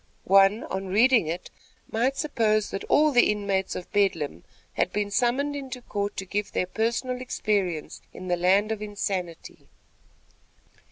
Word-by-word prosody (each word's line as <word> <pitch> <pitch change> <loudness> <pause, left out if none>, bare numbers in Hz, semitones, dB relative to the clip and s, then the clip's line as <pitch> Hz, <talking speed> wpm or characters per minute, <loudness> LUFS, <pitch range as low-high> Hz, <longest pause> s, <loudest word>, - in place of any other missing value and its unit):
One, 195 +4 +5
on 190 0 -4
reading 225 0 +4
it, 170 +3 -5 0.4
might 250 +5 0
suppose 220 -8 +1
that 195 - -4
all 305 +1 +4
the 245 -3 +5
inmates 200 -2 -1
of 180 - -7
Bedlam 165 - 0 0.3
had - - 0
been 205 -1 -2
summoned 260 +5 +1
into 265 -3 -6
court 205 -2 -3
to 190 - -3
give 205 +2 -3
their - - 0
personal 235 +6 -2
experience 195 -10 -2
in 185 - -9
the 180 - +2
land 190 +5 +2
of 220 -1 -3
insanity. 195 -5 -5
205 Hz, 150 wpm, -26 LUFS, 190-240 Hz, 0.4 s, One